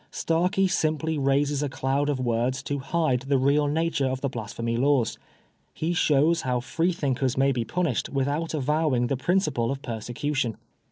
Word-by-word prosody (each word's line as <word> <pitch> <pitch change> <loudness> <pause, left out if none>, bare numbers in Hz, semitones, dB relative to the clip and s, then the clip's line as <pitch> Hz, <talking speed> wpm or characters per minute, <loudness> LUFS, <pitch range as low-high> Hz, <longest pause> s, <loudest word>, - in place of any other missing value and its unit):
Starkie 180 +4 +1
simply 160 -3 0
raises 140 +1 +1
a 145 - -1
cloud 135 +2 0
of 140 -3 -1
words 125 +2 0
to 145 0 -2
hide 135 -2 0
the 135 +2 0
real 140 +3 +3
nature 155 -2 0
of 130 0 -2
the 140 - 0
Blasphemy 115 -1 -4
Laws. 130 -2 +1 0.6
He 165 +2 -1
shows 160 0 +3
how 125 -1 0
Free 165 +9 0
thinkers 135 -5 -1
may 135 +1 +3
be 120 -3 -1
punished 170 -8 -1
without 145 +4 -1
avowing 150 -3 +1
the 135 - 0
principle 150 -6 +1
of 135 0 -4
persecution. 120 +2 -2
140 Hz, 165 wpm, -26 LUFS, 130-155 Hz, 0.6 s, real